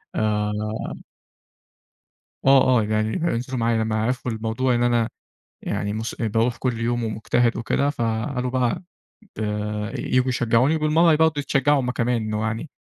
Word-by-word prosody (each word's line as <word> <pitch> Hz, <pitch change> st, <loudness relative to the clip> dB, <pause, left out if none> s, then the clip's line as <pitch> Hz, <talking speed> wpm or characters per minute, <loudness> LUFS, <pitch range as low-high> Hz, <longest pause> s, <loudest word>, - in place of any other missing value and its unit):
آآ 105 Hz, -1 st, 0 dB, 1.9 s
آه، 135 Hz, -1 st, +7 dB, 0.2 s
آه -, -, 0 dB
يعني 110 Hz, +1 st, 0 dB
هينزلوا 130 Hz, -4 st, -1 dB
معايا 115 Hz, 0 st, +1 dB
لما 110 Hz, 0 st, -1 dB
عرفوا 125 Hz, +1 st, -1 dB
الموضوع 115 Hz, +3 st, 0 dB
إن 120 Hz, -, +1 dB
أنا 120 Hz, -2 st, +2 dB, 0.5 s
يعني 100 Hz, 0 st, -2 dB
مس 110 Hz, +2 st, -4 dB
باروح 115 Hz, +1 st, 0 dB
كل 125 Hz, -3 st, -2 dB
يوم 120 Hz, +1 st, -1 dB
ومجتهد 115 Hz, +2 st, 0 dB
وكده، 140 Hz, +4 st, 0 dB
فقالوا 125 Hz, 0 st, -2 dB
بقى 125 Hz, +5 st, 0 dB, 0.5 s
ت -, -, -16 dB, 0.6 s
ييجوا 130 Hz, +1 st, +1 dB
يشجعوني 125 Hz, +4 st, +2 dB
وبالمرّة 160 Hz, +2 st, +4 dB
برضه 160 Hz, 0 st, +3 dB
يتشجعوا 140 Hz, +1 st, +2 dB
هُم 125 Hz, -1 st, -2 dB
كمان 120 Hz, -2 st, 0 dB
إنه 110 Hz, 0 st, -2 dB
يعني 115 Hz, +7 st, -4 dB
120 Hz, 140 wpm, -23 LUFS, 110-130 Hz, 1.9 s, آه